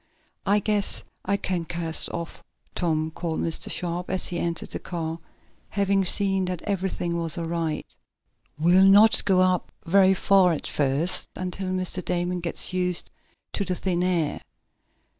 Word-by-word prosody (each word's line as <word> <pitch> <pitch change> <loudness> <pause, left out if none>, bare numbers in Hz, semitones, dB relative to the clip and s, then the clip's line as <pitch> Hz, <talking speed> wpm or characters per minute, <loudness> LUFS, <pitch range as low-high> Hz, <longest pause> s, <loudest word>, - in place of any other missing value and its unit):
"I 200 +1 +4
guess 210 -1 0 0.3
you 200 - +3
can 185 -3 -2
cast 165 -1 -2
off, 170 -1 -6 0.3
Tom," 160 -2 -1
called 165 0 -3
Mr. 165 - -2
Sharp, 175 0 -2
as 185 0 -2
he 175 - -3
entered 170 -1 -2
the - - -3
car, 165 -2 -4 0.5
having 195 -1 +1
seen 195 0 0
that 180 -2 -4
everything 185 -3 -2
was 165 -1 -2
all 170 - -3
right. 165 -2 -2 0.7
"We'll 180 +5 +5
not 210 +3 +7
go 190 -2 +4
up 185 -1 +1
very 190 +2 +5
far 190 -2 +4
at 155 - -4
first, 145 +5 +2
until 185 +1 -4
Mr. 185 0 -2
Damon 175 +1 -1
gets 170 +1 -1
used 180 -1 -1 0.4
to 200 - 0
the 185 -2 -2
thin 180 -1 -1
air." 175 -4 0
180 Hz, 155 wpm, -25 LUFS, 170-190 Hz, 0.7 s, not